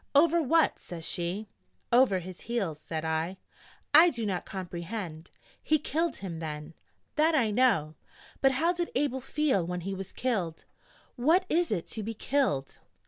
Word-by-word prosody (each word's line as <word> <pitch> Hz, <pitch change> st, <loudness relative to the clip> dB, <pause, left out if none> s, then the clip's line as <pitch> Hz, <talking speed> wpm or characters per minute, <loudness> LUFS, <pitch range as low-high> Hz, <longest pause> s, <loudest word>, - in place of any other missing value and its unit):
'Over 335 Hz, +3 st, +5 dB
what?' 320 Hz, +3 st, +3 dB
says 165 Hz, -2 st, -8 dB
she. 180 Hz, +4 st, -3 dB, 0.5 s
'Over 245 Hz, -6 st, +5 dB
his 180 Hz, 0 st, -8 dB
heels,' 200 Hz, -10 st, -2 dB
said 160 Hz, 0 st, -4 dB
I. 160 Hz, +4 st, -1 dB, 0.6 s
'I 325 Hz, +4 st, +9 dB
do 235 Hz, -8 st, -3 dB
not 190 Hz, -3 st, -2 dB
complehend!' 175 Hz, -2 st, -6 dB, 0.3 s
'He 310 Hz, -, +3 dB
killed 320 Hz, +3 st, -1 dB
him, 175 Hz, -4 st, -6 dB
then.' 150 Hz, 0 st, -6 dB, 0.4 s
'That 315 Hz, +1 st, +4 dB
I 230 Hz, -7 st, +3 dB
know. 205 Hz, -10 st, +3 dB, 0.5 s
But 270 Hz, -1 st, +5 dB
how 330 Hz, +7 st, +2 dB
did 345 Hz, -1 st, -2 dB
Abel 265 Hz, -1 st, 0 dB
feel 270 Hz, -, +1 dB
when 180 Hz, +1 st, -3 dB
he 195 Hz, +3 st, -3 dB
was 195 Hz, 0 st, -6 dB
killed? 190 Hz, -11 st, -2 dB, 0.5 s
What 325 Hz, +10 st, +4 dB
is 340 Hz, -2 st, +2 dB
it 180 Hz, -6 st, -1 dB
to 225 Hz, -, -4 dB
be 225 Hz, +2 st, -4 dB
killed?' 220 Hz, -, 0 dB
215 Hz, 160 wpm, -29 LUFS, 170-285 Hz, 0.6 s, I